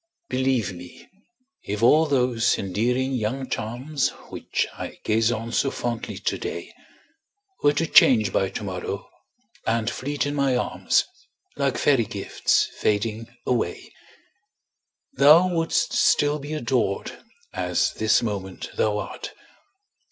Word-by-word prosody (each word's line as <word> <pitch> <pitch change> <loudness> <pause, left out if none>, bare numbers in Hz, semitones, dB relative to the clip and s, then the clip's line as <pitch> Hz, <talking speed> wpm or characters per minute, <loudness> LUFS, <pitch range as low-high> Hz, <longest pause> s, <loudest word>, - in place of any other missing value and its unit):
Believe 130 -6 0
me, 90 0 -12 0.5
if 105 +2 -4
all 155 +6 +5
those 125 -5 +2
endearing 125 +7 -1
young 130 +3 -2
charms, 130 +6 -2 0.2
Which - - -2
I - - -7
gaze 110 +1 +2
on 115 0 -4
so 135 - +1
fondly 120 -3 -4
today, - - -4 0.9
Were 145 - +4
to 160 +3 0
change 115 -8 +5
by 95 - +1
to - - -6
morrow, 95 -2 -5 0.6
and 115 0 +1
fleet 145 +2 -2
in 145 - -2
my 140 -3 +1
arms, - - +1 0.5
Like - - 0
fairy - - +3
gifts - - 0
fading 110 +2 0 0.2
away, 120 -8 -2 1.2
Thou 155 +7 +6
wouldst 165 0 0
still 145 +1 +3
be 145 +2 -6
adored, 120 -8 -1 0.3
as 90 -1 0
this 110 +1 +2
moment 100 -4 -5
thou 105 -1 +1
art. - - -6
120 Hz, 120 wpm, -24 LUFS, 105-140 Hz, 1.2 s, Thou